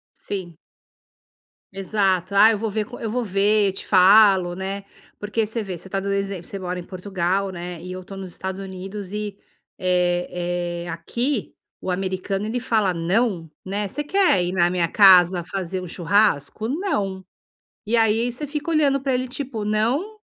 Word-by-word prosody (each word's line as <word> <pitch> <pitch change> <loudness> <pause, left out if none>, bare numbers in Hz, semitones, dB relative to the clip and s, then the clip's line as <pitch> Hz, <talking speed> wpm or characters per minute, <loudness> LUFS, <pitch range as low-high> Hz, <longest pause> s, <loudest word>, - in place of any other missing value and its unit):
Sim. 180 -5 -6 1.2
Exato, 195 -1 0
ah, 210 +3 +8
eu 215 - -1
vou 225 +2 -2
ver 215 +1 -1
com 245 +3 -11
eu 225 - -3
vou 245 +2 -1
ver, 200 0 +2
te 195 - -7
falo, 190 -1 +6
né. 195 +2 -4 0.3
Porque 210 +2 -1
você 220 +2 -2
vê 190 -4 -6
você 180 - -11
tá 195 +1 -2
dando 200 +1 -2
exemplo 195 -3 -2
você 200 - -6
mora 180 -1 -4
em - - -5
Portugal, 190 +1 -2
né, 175 -1 -7
e 180 +2 -8
eu 185 0 -7
tô 195 - -10
nos 190 -1 -7
Estados 190 +2 -5
Unidos 195 +1 -7
e, 210 -1 -4 0.4
eh 175 -1 -1
eh, - - -8
aqui 235 - -2 0.3
o - - -4
americano 190 +2 -2
ele 230 +3 -2
fala 215 -5 +1
não, 175 0 0
né, 200 +2 -2
você 295 +9 -2
quer 350 - +3
ir 175 - -2
na 175 -2 +3
minha 175 -1 +1
casa 180 -1 +6
fazer 185 0 -4
um 180 - -7
churrasco? 195 +2 +1
Não! 210 - -2 0.6
E 230 +3 +1
aí 225 +1 +3
você 250 +5 -5
fica 300 +3 -4
olhando 290 -4 +3
pra 270 -1 0
ele 255 +1 0
tipo 255 -4 -5
não 245 - 0
195 Hz, 175 wpm, -23 LUFS, 180-220 Hz, 1.2 s, ah